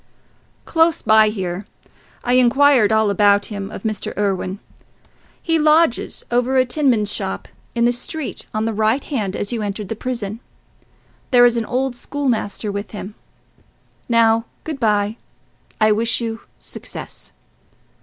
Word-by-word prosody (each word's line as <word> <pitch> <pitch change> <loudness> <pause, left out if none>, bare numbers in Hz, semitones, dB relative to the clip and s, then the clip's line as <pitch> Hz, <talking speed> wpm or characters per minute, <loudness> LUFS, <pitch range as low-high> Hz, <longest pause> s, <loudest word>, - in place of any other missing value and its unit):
"Close 325 0 +2
by 220 -1 +5
here. 190 -2 -4 0.6
I 245 - +1
inquired 255 -2 +5
all 220 -1 +3
about 205 0 +4
him 200 -1 -5
of - - -8
Mr. 215 -3 -3
Irwine. 195 -2 -1 0.8
He 325 -1 +1
lodges 305 -3 +2
over 250 +2 +2
a 255 - +4
tinman's 245 -6 +1
shop, 95 0 -3 0.3
in 235 0 +2
the 240 - +4
street 260 +5 -5
on 215 +1 -1
the 225 - -1
right 220 +5 +1
hand 210 -9 -3
as 205 - -3
you 235 -2 -2
entered 205 -1 -4
the 225 - -2
prison. 230 -3 -4 0.9
There 245 -1 +6
is 240 -1 +4
an 230 -1 -1
old 260 +1 -1
school 285 +3 -4
master 210 -2 -1
with 200 +1 -5
him. 205 -1 -7 1.0
Now, 230 -1 +4 0.2
good 310 -3 -5
bye: 210 -1 +1 0.6
I 215 -1 +4
wish 225 +2 +2
you 225 -1 -4 0.2
success." - - -8
225 Hz, 145 wpm, -20 LUFS, 205-250 Hz, 1.0 s, There